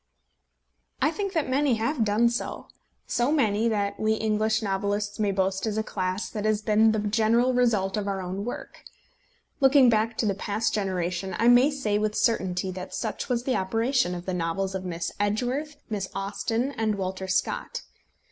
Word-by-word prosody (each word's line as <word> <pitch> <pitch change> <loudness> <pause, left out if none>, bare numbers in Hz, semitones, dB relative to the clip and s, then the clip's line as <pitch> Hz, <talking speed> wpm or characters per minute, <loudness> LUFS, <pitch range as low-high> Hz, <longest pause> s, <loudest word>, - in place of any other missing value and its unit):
I 305 - +2
think 395 +3 -3
that 320 -4 0
many 265 -1 +2
have 230 +3 0
done 215 +3 +3
so; 235 - -4 0.4
so 245 +3 0
many 225 -7 +2
that 200 -2 -1
we 215 0 +2
English 220 0 0
novelists 205 +1 -1
may 205 -2 +2
boast 190 +1 0
as 215 -1 -2
a 220 - +1
class 185 -1 -2
that 215 - -4
such - - +1
has 215 -1 +1
been 215 +1 +4
the 220 - 0
general 225 +4 +2
result 220 -6 +2
of 205 -1 -2
our 195 -1 -1
own 185 +2 -4
work. 245 - -7 0.8
Looking 270 -2 +6
back 220 0 +1
to - - +1
the 200 - +2
past 205 +3 -1
generation, 185 -2 -2
I 230 - +2
may 245 +4 +6
say 225 -8 -1
with 215 0 -1
certainty 185 -4 0
that 185 0 -7
such - - -4
was 240 -1 0
the 260 0 0
operation 225 0 +1
of 175 0 -7
the 185 - -2
novels 180 +3 -1
of 190 -1 -4
Miss 170 -1 -3
Edgeworth, 250 +9 -1
Miss 200 -4 -3
Austen, 225 +6 -2
and 220 -5 -1
Walter 190 -1 -4
Scott. 185 - -1
215 Hz, 185 wpm, -26 LUFS, 195-235 Hz, 0.8 s, Looking